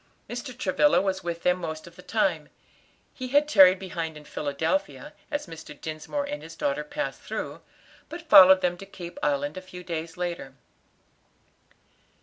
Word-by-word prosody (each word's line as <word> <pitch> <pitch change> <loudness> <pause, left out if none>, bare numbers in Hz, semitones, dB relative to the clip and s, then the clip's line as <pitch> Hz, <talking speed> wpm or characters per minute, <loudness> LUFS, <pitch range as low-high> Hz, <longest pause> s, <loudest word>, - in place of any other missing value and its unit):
Mr. 245 +1 -6
Travilla 255 +7 +3
was 190 0 -1
with 170 -1 -4
them 180 0 +2
most 160 -2 -5
of - - -14
the - - -12
time. - - 0 0.6
He 255 - -6
had 290 +3 +3
tarried 190 -8 +7
behind 165 -4 -5
in 150 - -13
Philadelphia, 150 - -2 0.2
as 290 -1 -2
Mr. 165 -4 -11
Dinsmore 155 - -4
and 295 +1 -5
his 165 0 -10
daughter 140 +1 -1
passed 290 - -4
through, - - -5 0.5
but 335 0 -9
followed 190 -8 +9
them 175 -1 0
to 195 - -10
Cape 175 -3 -9
Island 145 +2 0
a - - -5
few 180 -1 -11
days 165 -1 -5
later. 170 -6 -4
180 Hz, 160 wpm, -26 LUFS, 160-215 Hz, 0.6 s, followed